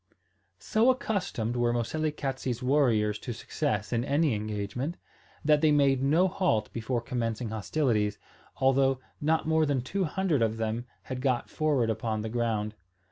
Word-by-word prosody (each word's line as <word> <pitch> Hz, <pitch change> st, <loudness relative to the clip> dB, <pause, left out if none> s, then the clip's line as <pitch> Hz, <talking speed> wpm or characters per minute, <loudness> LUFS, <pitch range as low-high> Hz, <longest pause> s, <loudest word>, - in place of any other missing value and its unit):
So 220 Hz, -, +2 dB
accustomed 200 Hz, -, -1 dB
were 120 Hz, -1 st, +2 dB
Moselekatse's 135 Hz, -1 st, -2 dB
warriors 115 Hz, -6 st, +2 dB
to 120 Hz, -, -5 dB
success 110 Hz, -2 st, -2 dB
in 120 Hz, 0 st, +1 dB
any 145 Hz, +1 st, +2 dB
engagement, 105 Hz, -, -3 dB, 0.5 s
that 150 Hz, -1 st, +4 dB
they 155 Hz, -1 st, +5 dB
made 140 Hz, -3 st, +3 dB
no 155 Hz, +7 st, +4 dB
halt 175 Hz, -, 0 dB
before 115 Hz, +1 st, -2 dB
commencing 115 Hz, -1 st, -2 dB
hostilities, 110 Hz, -2 st, 0 dB, 0.4 s
although 135 Hz, 0 st, +3 dB, 0.2 s
not 160 Hz, +2 st, +1 dB
more 160 Hz, -1 st, +3 dB
than 140 Hz, -3 st, +1 dB
two 190 Hz, +8 st, -1 dB
hundred 165 Hz, -4 st, 0 dB
of 110 Hz, 0 st, +1 dB
them 115 Hz, +2 st, -2 dB, 0.2 s
had 130 Hz, -1 st, -5 dB
got 130 Hz, -3 st, 0 dB
forward 140 Hz, -7 st, +1 dB
upon 110 Hz, 0 st, -2 dB
the 110 Hz, -, -4 dB
ground. 110 Hz, -2 st, -1 dB
125 Hz, 145 wpm, -28 LUFS, 110-150 Hz, 0.5 s, they